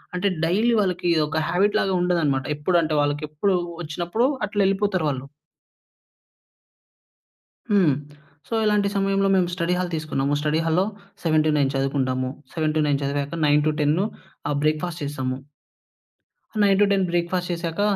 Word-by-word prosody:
అంటే, 180 +3 0 0.2
డైలీ 215 +8 +2
వాళ్ళకి 180 -3 0 0.2
ఒక 160 - -3
హాబిట్ 205 +4 +2
లాగా 195 - 0
ఉండదన్నమాట. 160 -7 +1
ఎప్పుడు 170 +4 +2
అంటే, 155 -1 -1
వాళ్ళకి 145 +1 -1
ఎప్పుడు 185 +6 +1 0.3
వచ్చినప్పుడు 175 +9 -1 0.2
అట్లా 205 0 -1
ఎళ్ళిపోతారు 195 -4 0
వాళ్ళు. 130 -1 -4 2.5
హ్మ్. 185 -8 +4 0.5
సో, - - -6
ఇలాంటి 210 -1 +2
సమయంలో 195 0 +2
మేము 185 -2 +3
స్టడీ 175 0 0
హాల్ 180 -1 -2
తీసుకున్నాము. 145 -3 -1
స్టడీ 150 +1 +1
హాల్‌లో 165 +4 +2 0.4
7-9 155 -4 +2
చదువుకుంటాము. 130 -1 0 0.2
7-9 155 -3 +1
చదివాక, 140 +2 -2
9-10 150 +4 +2 0.4
ఆహ్, 145 - 0
బ్రేక్‌ఫాస్ట్ 155 +2 -1
చేసాము. 130 -3 -3 1.2
9-10 200 -1 +3
బ్రేక్‌ఫాస్ట్ 175 +1 -1
చేసాక, 170 +1 -3
165 Hz, 120 wpm, -23 LUFS, 145-190 Hz, 2.5 s, హ్మ్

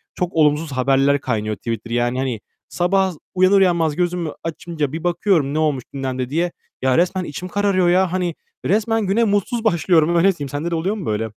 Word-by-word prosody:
Çok 180 -1 -2
olumsuz 150 -1 +2
haberler 135 +2 +2
kaynıyor 110 -4 -2
Twitter. 115 +2 -5
Yani, 120 +1 0
hani, 130 -5 -2 0.3
sabah 190 +1 +1 0.2
uyanır 185 +2 +5
uyanmaz 170 -5 +2
gözümü 175 -3 -1
açınca 165 -3 -3
bir 165 +1 -5
bakıyorum 170 -5 +1
ne 155 - 0
olmuş 150 -5 0
gündemde 130 -2 -3
diye. 170 +4 0 0.3
Ya, 130 -1 +2
resmen 180 +2 +1
içim 160 +3 -6
kararıyor 190 -2 +1
ya. 185 0 +3
Hani, 180 -3 -1 0.3
resmen 220 +2 +1
güne 215 +5 +2
mutsuz 215 +3 0
başlıyorum. 170 -4 +3
Öyle 185 +3 +4
diyeyim. 145 -2 -5
Sende 145 +5 -3
de - - 0
oluyor 185 +6 -1
mu 200 - -6
böyle? 110 +1 -1
165 Hz, 185 wpm, -20 LUFS, 140-185 Hz, 0.3 s, uyanır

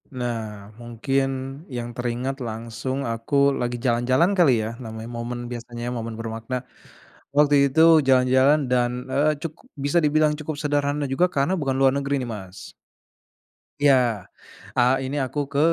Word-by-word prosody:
Nah 110 -5 -5
mungkin 135 +4 -1 0.5
yang 120 0 -5
teringat 125 +3 -3
langsung 115 +4 -4
aku 115 +4 -3 0.3
lagi 120 0 -2
jalan-jalan 130 +9 +2
kali 170 -6 +5
ya - - -3
namanya 110 -1 -7
momen 120 +1 -4
biasanya 120 0 -6
momen 115 -1 -5
bermakna, 115 +2 -5 0.8
waktu 145 0 +5
itu 160 +4 +2 0.3
jalan-jalan 130 +3 +4
dan, 120 -1 +2 0.2
eee, 150 +1 +2
cukup 165 - -7 0.2
bisa 145 +4 +1
dibilang 150 0 +3
cukup 155 0 -4
sederhana 145 -1 0
juga 155 +7 +3
karena 140 +2 0
bukan 135 -3 -1
luar 135 -1 +4
negeri 140 0 -1
nih, 125 - -5
Mas. 95 -2 -10 1.1
Iya, 145 -1 +5 0.8
eee, 125 +1 +4
ini 140 - -4
aku 140 +3 -4
ke 140 - 0
130 Hz, 140 wpm, -23 LUFS, 120-145 Hz, 1.1 s, kali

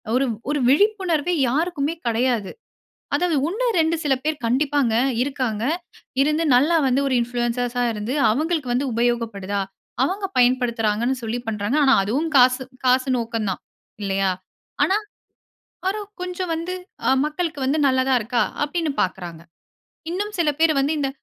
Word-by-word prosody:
ஒரு 265 +2 +3 0.2
ஒரு 290 -1 0
விழிப்புணர்வே 360 -1 +2 0.2
யாருக்குமே 305 +1 0
கடையாது. 230 -2 0 0.6
அதாவது 350 -4 +1
ஒண்ணு 440 +8 -2
2 330 -2 +2
சில 280 -2 +3
பேர் 310 -1 0
கண்டிப்பாங்க 270 -1 +1 0.3
இருக்காங்க. 255 -6 -2 0.6
இருந்து 305 +3 +1
நல்லா 295 +7 +4
வந்து 260 +1 +2
ஒரு 260 - 0
இன்ஃப்ளூயன்சஸ்ஸா 245 +1 -1
இருந்து, 215 +4 -3 0.2
அவுங்களுக்கு 300 0 0
வந்து 270 +3 0
உபயோகப்படுதா? 225 -4 -1 0.4
அவங்க 390 +7 -2
பயன்படுத்துகிறாங்கன்னு 245 -1 +2
சொல்லி 225 +2 -2
பண்றாங்க. 210 +5 -1
ஆனா, 270 - +5
அதுவும் 285 +11 -1
காசு 255 +1 +5 0.2
காசு 255 +1 +3
நோக்கம் 230 -2 -2
தான். 185 - -4 0.4
இல்லயா! 195 -1 +1 0.5
ஆனா, 390 - +2 0.9
பாரு 395 +3 0 0.2
கொஞ்சம் 360 0 -4
வந்து 335 +3 -4 0.3
அ - - +5
மக்களுக்கு 305 -1 -3
வந்து 275 +4 +1
நல்லதா 260 0 +2
இருக்கா! 235 +1 0 0.2
அப்டின்னு 320 +1 -1
பார்க்குறாங்க. 175 -3 -4 0.7
இன்னும் 410 +4 -3
சில 325 -3 +3
பேரு 320 -2 +4
வந்து 285 +3 +1
இந்த 275 -2 0
265 Hz, 135 wpm, -22 LUFS, 235-320 Hz, 0.9 s, ஆனா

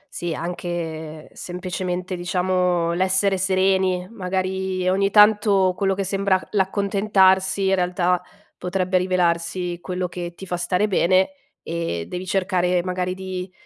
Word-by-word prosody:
Sì, 175 -1 -3
anche 165 -3 -5
semplicemente, 180 0 -4
diciamo, 180 -1 0
l'essere 190 +2 +2
sereni. 190 -1 +1
Magari, 190 -2 -2
ogni 195 +2 +2
tanto 205 -2 +5
quello 195 0 0
che 195 - -2
sembra 195 0 +1
c - - -13
l'accontentarsi 195 -1 +2
in - - +3
realtà 180 -1 +1 0.4
potrebbe 185 0 0
rivelarsi 175 -1 0
quello 180 0 -3
che 175 -1 -6
ti 190 - -9
fa 180 - -3
stare 180 +4 0
bene 185 0 +3 0.3
e 165 - -3
devi 180 +1 -6
cercare 180 -2 +1
magari 185 0 -2
di, 185 -1 -6
185 Hz, 125 wpm, -22 LUFS, 180-190 Hz, 0.4 s, tanto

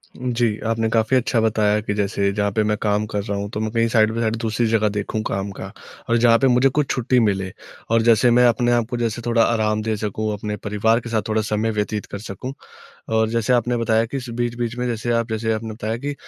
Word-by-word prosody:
जी, 120 -3 -1
आपने 115 0 0
काफ़ी 115 +3 +2
अच्छा 125 -1 +1
बताया 105 -1 +2
कि 105 - -3
जैसे 100 -1 0
जहाँ 100 -1 0
पे 110 +2 +1
मैं 105 0 +1
काम 105 0 +1
कर 100 -1 -1
रहा 100 -2 -3
हूँ 100 0 -4
तो 105 - -4
मैं 110 -1 -2
कहीं 115 0 +2
साइड 110 -1 +3
बाय 115 - -2
साइड 110 0 0
दूसरी 115 0 0
जगह 110 -1 +2
देखूँ 105 +1 -3
काम 100 +1 -3
का, 95 0 -8 0.4
और 120 - +3
जहाँ 115 0 +5
पे 135 - +3
मुझे 125 +2 +4
कुछ 145 +1 -1
छुट्टी 125 0 +1
मिले। 95 -4 0 0.4
और 115 0 +3
जैसे 115 +1 +4
मैं 125 +1 +5
अपने 120 +1 +2
आप 120 -1 +2
को 120 - -3
जैसे 115 0 -2
थोड़ा 115 -1 +3
आराम 110 -2 +1
दे 110 0 -1
सकूँ, 110 +1 -2
अपने 105 +1 -4
परिवार 105 +3 +1
के 115 - -8
साथ 110 -2 0
थोड़ा 110 0 +1
समय 110 +1 -1
व्यतीत 105 0 -2
कर 100 - -5
सकूँ। 110 +5 -7 0.6
और 110 0 +3
जैसे 115 +1 0
आपने 120 0 +2
बताया 115 -1 +2
कि 125 - -5
इस 130 -2 -6
बीच-बीच 120 0 -2
में 125 - -1
जैसे 120 0 -2
आप 115 0 0
जैसे 110 0 -1
आपने 110 0 -4
बताया 110 0 -3
कि 145 +3 -4
110 Hz, 245 wpm, -21 LUFS, 105-120 Hz, 0.6 s, जहाँ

